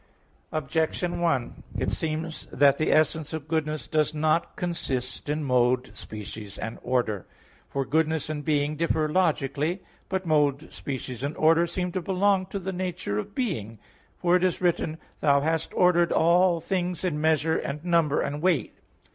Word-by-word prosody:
Objection 160 +4 -1
1: 160 -8 0 0.2
It - - 0
seems 160 0 -3
that 140 -1 +4
the 155 - +2
essence 155 0 +2
of 155 -2 -5
goodness 155 -1 -1
does 155 0 0
not 155 +2 +1
consist 135 -7 -3
in 150 +1 -1
mode, 125 -1 +2
species 105 -1 -8
and 115 - -5
order. 115 -6 -1 0.4
For 135 -1 -1
goodness 160 0 +1
and 150 -1 -4
being 150 -1 +1
differ 160 -1 +1
logically. 155 0 0 0.3
But 190 -1 -2
mode, 150 -2 +1
species 130 -2 -5
and 145 +2 -3
order 165 +2 +4
seem 180 +1 -2
to 185 - -2
belong 190 +1 +2
to 195 - -4
the 190 0 -4
nature 180 - -2
of 200 - -7
being, 130 - -2 0.4
for 175 0 +3
it 180 - +2
is 185 -2 +1
written: 170 -3 0 0.2
"Thou 140 -1 +4
hast 160 +1 0
ordered 175 -2 +4
all 175 +1 +4
things 180 0 -2
in 155 -5 -1
measure, 160 0 +2
and 150 +4 -5
number, 165 -4 +3
and 145 +1 -3
weight" 175 -4 +1
(Wis. - - -33
155 Hz, 165 wpm, -26 LUFS, 140-175 Hz, 0.4 s, that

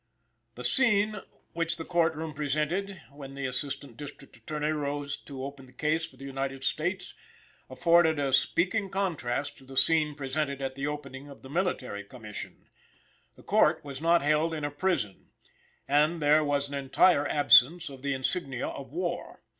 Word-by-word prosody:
The 125 - -8
scene 210 - +3 0.4
which 170 0 -1
the 165 - -5
court 170 -2 +2
room 160 0 -5
presented, 155 +7 -1
when 140 -1 -10
the 140 0 -4
Assistant 130 -1 -4
District 145 -1 -10
Attorney 150 +6 -3
arose 145 -1 -2
to 135 -2 -7
open 135 -1 -8
the - - -17
case 160 +2 0
for 130 - -20
the 135 - -10
United 135 0 -4
States, 130 - -1 0.6
afforded 165 +3 +4
a 140 -2 0
speaking 195 - +2
contrast 165 -9 -2
to - - -17
the 135 0 -10
scene 150 +2 +4
presented 140 0 -2
at 135 -1 -3
the 140 +2 -3
opening 145 -1 -6
of 140 - -13
the 130 - -10
Military 145 - -1
Commission. 105 -1 -9 0.7
The - - -17
Court - - +3
was 140 0 -7
not 170 -1 +4
held 155 +2 +2
in 155 - -5
a 145 - -2
prison, 145 - -1 0.6
and 150 +4 +3
there 150 +1 +4
was 145 -1 0
an 140 - -9
entire 140 +3 +3
absence 145 +4 +6
of 135 -2 -9
the 140 0 -1
insignia 135 -1 0
of 140 +1 -9
war. 175 0 -4
145 Hz, 170 wpm, -29 LUFS, 135-165 Hz, 0.7 s, absence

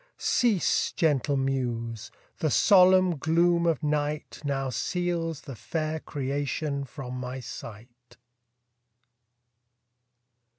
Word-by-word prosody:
Cease, 225 -7 +2
gentle 145 -3 +1
muse! 120 -5 -2 0.3
the 155 - +1
solemn 185 +1 +5
gloom 170 +2 +2
of 160 -3 0
night 150 0 -2
Now 135 -2 -1
seals 165 +3 -2
the 135 - -8
fair 155 +7 -3
creation 140 +1 -3
from 130 -1 -8
my 125 +1 -5
sight. 120 +1 -11
145 Hz, 90 wpm, -27 LUFS, 130-165 Hz, 0.3 s, solemn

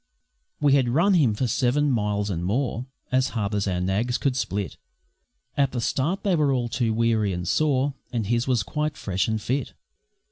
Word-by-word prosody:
We 145 -2 +4
had 130 -3 +3
run 170 +11 +3
him 135 - +3
for 130 - 0
seven 130 +5 +1
miles 105 -3 0
and 85 -2 -3
more 120 +5 -1 0.2
As 130 +1 +2
hard 105 -1 -1
as 100 -1 0
our 90 -2 0
nags 100 +7 0
could 135 -2 0
split; 105 - -3 0.8
At 140 -2 +1
the 125 - -1
start 155 - -1
they 195 -3 +2
were 150 -3 +2
all 125 -3 0
too 115 -1 0
weary 110 -2 +1
and 90 0 -4
sore, 140 - +2 0.2
And 115 -3 -1
his 120 +4 0
was 125 -6 +2
quite 150 +8 -2
fresh 95 -2 -1
and 110 -1 0
fit. 130 +5 -2
120 Hz, 190 wpm, -25 LUFS, 105-140 Hz, 0.8 s, We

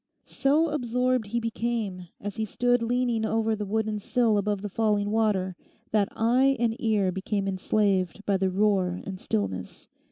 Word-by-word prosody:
So 305 +4 +2
absorbed 250 -4 0
he 235 +3 -1
became 225 -5 -3
as 205 0 -6
he 220 - 0
stood 245 +3 +1
leaning 240 -1 0
over 220 0 +1
the 210 -1 -4
wooden 215 0 -1
sill 225 -1 +2
above 205 0 -1
the - - -2
falling 205 0 +1
water, 205 -4 +1 0.4
that 210 -2 +2
eye 255 +4 +3
and 230 -1 +1
ear 210 -5 +2
became 195 +2 -2
enslaved 195 0 0
by 200 -1 +2
the 190 0 +1
roar 190 -2 +1
and 190 -1 -6
stillness. 95 - -3
215 Hz, 160 wpm, -27 LUFS, 195-235 Hz, 0.4 s, eye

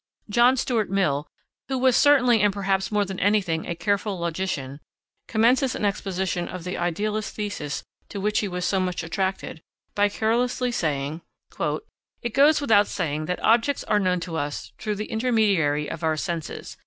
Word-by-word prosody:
John 240 +4 +5
Stuart 235 -4 0
Mill, 155 -7 0 0.4
who 265 - -1
was 255 -1 +3
certainly 250 -6 +5
and 205 -1 +4
perhaps 195 0 -1
more 210 -1 +2
than 190 -1 -6
anything 190 -5 +1
a 170 - -3
careful 200 +2 -1
logician, 165 -5 -3 0.5
commences 245 +4 +3
an - - -2
exposition 190 -3 -1
of 180 -2 -7
the 180 +1 -4
idealist 210 +5 -2
thesis 205 -9 -4 0.3
to 200 - -5
which 210 +2 +1
he 210 - -1
was 180 -1 -3
so 195 - +1
much 180 -2 -2
attached, 190 -1 -3 0.3
by 205 0 +3
carelessly 245 +4 0
saying: 150 -5 -2 1.0
"It 235 -2 -3
goes 295 +3 +5
without 215 -8 +4
saying 155 -4 -2
that 180 - -3
objects 235 +5 +3
are 210 - +2
known 185 -2 +1
to 165 -1 -4
us 145 -8 -4
through 210 -1 -2
the 210 +1 -4
intermediary 200 -11 +2
of 165 - -6
our 160 -1 +1
senses.... 170 -1 -5
195 Hz, 165 wpm, -24 LUFS, 170-220 Hz, 1.0 s, John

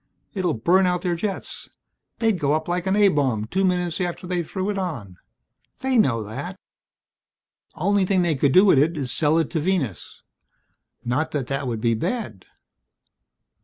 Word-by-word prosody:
It'll 185 - 0
burn 180 +11 +3
out 180 -1 -1
their 180 - 0
jets. 195 +3 -4 0.5
They'd 225 -5 +1
go 145 -1 +1
up 155 +1 -1
like 175 +1 -2
an 190 - +2
A 205 -1 +5
bomb 130 - 0
two 190 - -1
minutes 180 -2 0
after 180 +1 -3
they 180 -1 -1
threw 190 +4 -3
it 200 - -4
on. 120 - -5 0.6
They 265 0 0
know 125 - +3
that. 105 +2 -7 1.2
Only 200 +3 +2
thing 185 -2 +2
they 170 -2 +2
could 140 -1 +2
do 185 +7 +6
with 185 -9 +5
it 160 +3 +2
is 130 -4 -2
sell 155 +3 +2
it 165 -3 0
to 165 - 0
Venus. 155 - -2 0.8
Not 130 +7 0
that 140 -4 -1
that 135 -1 -2
would 115 -3 -3
be 115 0 +2
bad. 115 - -3
170 Hz, 175 wpm, -23 LUFS, 135-190 Hz, 1.2 s, do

